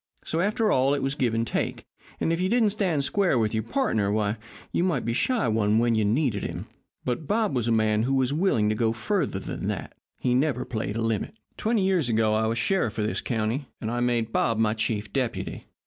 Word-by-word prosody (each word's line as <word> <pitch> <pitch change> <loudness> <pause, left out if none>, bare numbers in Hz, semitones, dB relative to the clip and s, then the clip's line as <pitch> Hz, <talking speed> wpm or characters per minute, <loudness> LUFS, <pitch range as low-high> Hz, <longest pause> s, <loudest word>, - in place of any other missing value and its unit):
So, 160 - -1
after 210 +3 +1
all, 135 +2 +3
it 140 - -3
was 135 0 0
give 125 -5 0
and 115 0 +1
take, - - -2 0.3
and 165 - +1
if 165 - -1
you 185 - +1
didn't 225 -2 +3
stand 185 -9 0
square 190 -2 +2
with 110 -2 +1
your 110 - +1
pardner, 110 - 0
why, 105 +1 0 0.3
you - - +1
might 170 -9 0
be 115 - 0
shy 240 - +1
one 110 -1 +2
when 120 0 +3
you 110 -1 +2
needed 110 -1 +1
him. - - -5 0.4
But 125 +5 -2
Bob 215 -6 +1
was 120 -2 0
a - - +2
man 110 -1 +2
who 135 +4 +1
was 130 0 +1
willing 150 - +2
to - - +2
go 115 0 +1
further 155 - -1
than 95 - -5
that. - - -4 0.2
He 125 - 0
never 130 -1 +1
played 110 -4 -3
a 115 - -1
limit. 115 - -1 0.2
"Twenty 220 -2 +1
years 185 -9 +2
ago 110 -1 +2
I 110 +1 +2
was 115 +1 -1
sheriff 120 - 0
of 105 - 0
this 110 - -1
county, 115 +4 -2
and 110 - -3
I 120 - -1
made 120 -2 0
Bob 115 -2 +1
my 110 -1 +2
chief 105 -2 -2
deputy. 130 -4 -3
120 Hz, 230 wpm, -26 LUFS, 110-160 Hz, 0.4 s, all